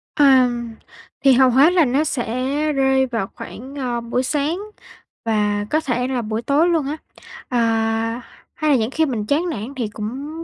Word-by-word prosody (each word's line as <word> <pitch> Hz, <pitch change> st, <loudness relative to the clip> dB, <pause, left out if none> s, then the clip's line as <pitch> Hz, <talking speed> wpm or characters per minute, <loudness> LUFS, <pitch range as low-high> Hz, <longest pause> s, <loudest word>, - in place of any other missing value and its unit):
À, 265 Hz, -4 st, +6 dB, 0.8 s
thì 270 Hz, -, +7 dB
hầu 260 Hz, 0 st, +5 dB
hết 275 Hz, +7 st, +5 dB
là 350 Hz, -4 st, +4 dB
nó 275 Hz, +4 st, +1 dB
sẽ 270 Hz, +3 st, -1 dB
rơi 265 Hz, -1 st, +2 dB
vào 230 Hz, -5 st, -2 dB
khoảng, 265 Hz, +5 st, -9 dB
ờ, 245 Hz, -4 st, -2 dB
buổi 235 Hz, +2 st, -1 dB
sáng 295 Hz, +6 st, -1 dB, 0.7 s
và 210 Hz, -2 st, 0 dB
có 310 Hz, -, +2 dB
thể 250 Hz, -4 st, -1 dB
là 255 Hz, -2 st, -1 dB
buổi 215 Hz, +1 st, -3 dB
tối 285 Hz, +8 st, +2 dB
luôn 325 Hz, -4 st, +1 dB
á. 300 Hz, -, -3 dB, 0.5 s
Ờ, 250 Hz, -, -1 dB, 1.0 s
hay 305 Hz, -1 st, +1 dB
là -, -, +5 dB
những 225 Hz, +2 st, -1 dB
khi 320 Hz, +3 st, +1 dB
mình 235 Hz, -7 st, -3 dB
chán 315 Hz, +9 st, 0 dB
nản 235 Hz, -1 st, -5 dB
thì 240 Hz, -5 st, -2 dB
cũng 270 Hz, +10 st, -6 dB
265 Hz, 180 wpm, -20 LUFS, 235-295 Hz, 1.0 s, thì